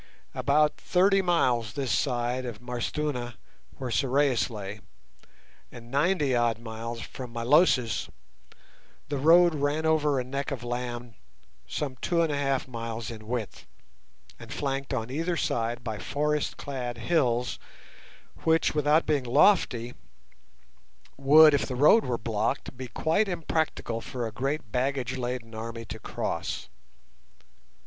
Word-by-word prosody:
About 150 +2 +2
thirty 195 +2 +3
miles 125 - +1
this 135 -4 -2
side 125 -1 0
of 120 -4 -6
M'Arstuna, 125 0 -3 0.4
where 130 -2 -4
Sorais 130 -5 +2
lay, 105 -2 -7 0.9
and 120 0 -12
ninety 145 -2 +2
odd 120 -2 +2
miles 115 0 -6
from 125 0 -8
Milosis, 125 - +2 1.0
the 145 -2 -2
road 170 +4 +6
ran 145 +2 0
over 150 -3 +2
a - - -1
neck 135 +2 -3
of 135 -5 -5
land 120 -1 -4 0.5
some 135 -3 -4
two 170 +5 +1
and 160 - 0
a - - 0
half 135 -2 0
miles 115 -1 -5
in 110 -2 -10
width, 120 -3 -4 0.7
and - - -11
flanked 135 -1 -3
on 125 -2 -2
either 165 +4 -1
side 120 -2 -1
by 110 -3 -4
forest 150 +6 -1
clad 125 -4 -5
hills 125 -2 0 0.8
which, 160 0 +2
without 150 +2 +3
being 145 -3 +1
lofty, 125 - +3 1.2
would, 150 +3 +7
if 145 - +1
the 130 - -4
road 150 - +5
were 120 -2 -1
blocked, 115 +5 -2
be 130 0 -6
quite 165 - +1
impracticable 160 -9 -2
for 125 0 -4
a 110 - -4
great 135 +1 -3
baggage 130 0 -1
laden 120 -2 -4
army 115 +1 -6
to - - -7
cross. - - -4
130 Hz, 135 wpm, -27 LUFS, 120-150 Hz, 1.2 s, would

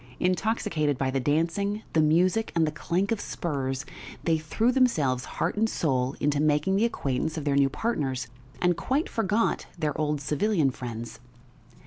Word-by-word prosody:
Intoxicated 180 - 0
by 130 0 0
the 135 - 0
dancing, 170 - 0
the 160 - +4
music, 180 +8 +3
and 165 -1 +4
the 155 - -1
clank 180 +6 -1
of 225 - +1
spurs, 135 -4 -3 0.4
they 165 -2 +2
threw 220 +10 +1
themselves 155 - +2
heart - - 0
and 220 +1 +2
soul 130 -7 0
into 145 0 +1
making 150 +5 +2
the 210 +4 +3
acquaintance 155 - -1
of 155 - -4
their 145 - +2
new 140 -1 +4
partners, 135 - -2 0.3
and 180 -1 +3
quite 265 - 0
forgot 225 0 0
their 150 -3 -1
old 150 -1 0
civilian 150 +1 +1
friends. 120 -2 -7
155 Hz, 160 wpm, -27 LUFS, 140-200 Hz, 0.4 s, the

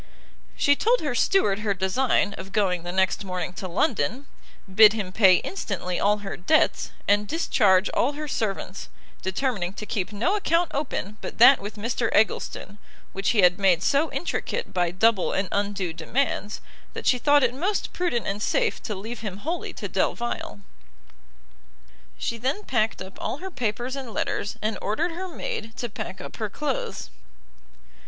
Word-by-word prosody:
She 285 - +4
told 475 +10 +2
her 290 -5 -1
steward 230 - +2
her 210 -2 0
design 200 +2 +1
of 190 +1 -9
going 185 -4 +1
the 175 +1 -5
next 190 +2 +1
morning 185 -1 -4
to 185 +1 -5
London, 225 - 0 0.5
bid 215 +1 +8
him 205 -4 -3
pay 190 -2 +6
instantly 180 -1 -3
all 210 +1 +3
her 195 - -4
debts, 310 - +2 0.2
and 205 +1 +3
discharge 205 - +3
all 275 +4 +1
her 300 +1 -5
servants, 200 -6 -3 0.3
determining 190 -2 -1
to 210 - -7
keep 200 -1 -2
no 235 - 0
account 345 -4 +1
open 235 -7 -3
but - - -7
that 260 +4 +8
with 205 +2 -7
Mr 230 +2 -1
Eggleston, 205 -1 0 0.3
which 195 +1 -1
he 215 -5 +3
had 180 +1 +5
made 190 -3 +3
so 290 +3 +2
intricate 475 +6 -3
by 175 -2 +1
double 190 +2 +2
and 195 0 0
undue 200 -4 -1
demands, 225 0 -2 0.3
that - - -7
she 250 - +3
thought 290 +1 +4
it 245 -1 +2
most 370 +10 -2
prudent 340 -10 -1
and 200 +2 -3
safe - - 0
to 210 - -4
leave 220 +5 -6
him 205 -4 -5
wholly 325 - -3
to - - -6
Delvile. 235 - -2 1.6
She 235 - -3
then 270 - -1
packed 225 - 0
up 190 +1 -12
all - - -2
her 380 +4 -7
papers 245 - -2
and 265 -4 -6
letters, 205 - -2
and 215 +1 -1
ordered 320 +12 -1
her 365 +3 -5
maid 225 -9 -5
to 240 - -3
pack 190 -2 -6
up - - -9
her 215 -2 -2
clothes. 280 +4 -4
215 Hz, 170 wpm, -25 LUFS, 195-270 Hz, 1.6 s, bid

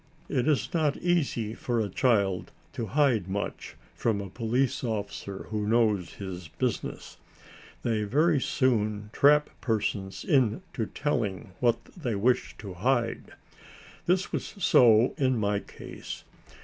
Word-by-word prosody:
It 125 - 0
is 155 +4 +1
not 155 -4 +1
easy 140 -11 0
for 120 0 -1
a 110 - 0
child 100 -3 +1 0.2
to 115 - -3
hide 125 -6 +2
much 100 +2 -4 0.2
from 110 -3 0
a 100 -2 -6
police 120 +5 0
officer 100 -3 -4
who 105 -1 -1
knows 105 -5 +2
his 95 -4 -6
business. - - -3 0.7
They 110 -2 +1
very 150 +6 +3
soon 105 -6 0
trap 150 +1 +5
persons 100 -4 -2
into 125 - +1
telling 100 -11 -2
what 120 -2 +1
they 125 - -2
wish 100 -3 +1
to 100 -3 -8
hide. 115 +4 0 0.7
This 180 +1 +2
was - - -4
so 120 - +5
in 130 -2 +2
my 105 -2 +1
case. - - -9
115 Hz, 130 wpm, -28 LUFS, 100-130 Hz, 0.7 s, trap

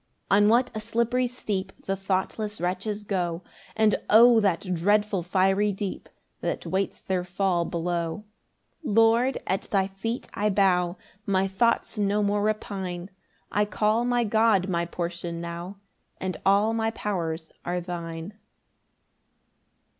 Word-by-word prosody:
9 200 +1 +6
On 205 - +5
what 245 +2 +3
a 215 - -3
slippery 235 +3 0
steep 200 -6 -3
The 195 - 0
thoughtless 195 +2 -2
wretches 195 +4 -2
go; 180 -4 -2 0.3
And 220 -1 +3
O 230 +1 +8
that 185 -2 0
dreadful 205 +2 +2
fiery 195 +3 +2
deep 195 0 -5 0.3
That - - -3
waits 190 +1 -1
their 185 -2 -1
fall 180 -1 0
below. 170 +2 -2 0.6
10 220 -8 -2
Lord, 230 +3 +4
at 190 - -2
thy 195 -2 +2
feet 195 +5 -4
I 210 +1 +1
bow, 185 -3 +2 0.3
My 195 -1 +2
thoughts 220 +3 +1
no 205 +1 +2
more 205 0 +1
repine; 190 -4 -3 0.4
I 210 - +2
call 215 +2 +1
my 245 0 +2
God 220 -3 +3
my 170 -2 0
portion 170 -1 -4
now, 170 +3 -6 0.4
And 185 -1 -3
all 205 +3 +4
my 225 0 +1
powers 170 -7 -3
are 180 +1 -1
thine. 170 +1 -6
195 Hz, 140 wpm, -26 LUFS, 180-215 Hz, 0.6 s, O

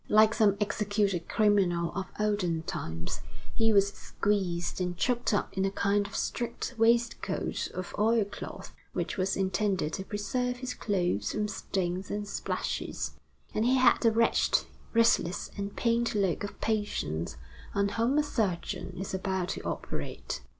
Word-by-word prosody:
Like 215 +1 +6
some 205 -4 +4
executed 205 -3 0
criminal 190 -6 +3
of 195 -1 -3
olden 195 -6 +1
times, 80 - -4 0.3
he 225 0 +3
was 200 -1 +5
squeezed 185 -5 -1
and 180 -1 -1
choked 245 +3 +1
up 205 - 0
in 190 - +1
a 195 - +2
kind 200 +1 +1
of 200 - -10
straight 240 +2 -2
waistcoat 235 +1 +1
of 185 -1 -5
oilcloth, 215 -2 0 0.2
which - - -2
was 190 0 +1
intended 190 -3 0
to 190 - -3
preserve 245 +5 -1
his 250 0 -4
clothes 175 - 0
from 210 -1 0
stains 190 -2 -2
and 205 0 -3
splashes; - - -2 0.4
and 215 - +1
he 250 +3 +4
had 255 -1 +5
the 230 - +5
wretched, 230 +1 +3 0.3
restless, 230 -5 +3
and 200 0 -4
pained 235 -1 +1
look 195 -3 +1
of 205 - -6
patients 85 - -1 0.4
on 200 0 +2
whom 230 +7 +1
a 300 - +4
surgeon 205 -11 -2
is 190 +2 -4
about 190 -1 -1
to - - -3
operate. - - -4
205 Hz, 150 wpm, -30 LUFS, 185-225 Hz, 0.4 s, Like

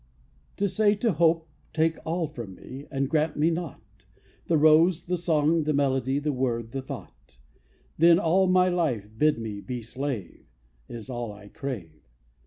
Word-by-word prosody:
To 200 - +1
say 210 +1 +2
to 225 +2 +1
hope, 165 -1 +2 0.3
Take 160 0 +1
all 165 +1 0
from 120 -10 -8
me, 135 +8 -10
And 135 -1 -1
grant 155 +1 0
me 155 +3 +3
naught: 110 - -7 0.4
The 165 - +3
rose, 155 +3 +5
the 180 - 0
song, 165 -1 +2
the 155 0 0
melody, 135 -1 +1
The 145 0 -1
word, 120 -3 -2
the 135 - -3
thought: 65 - -10 0.6
Then 170 +1 +7
all 185 +2 +3
my 185 0 +4
life 155 - 0
bid 150 +4 +3
me 110 -3 -5
be 125 0 -5
slave, 125 -5 -5 0.4
Is 115 -3 -8
all 120 -3 -4
I 105 0 -13
crave. 100 - -7
145 Hz, 165 wpm, -26 LUFS, 120-165 Hz, 0.6 s, Then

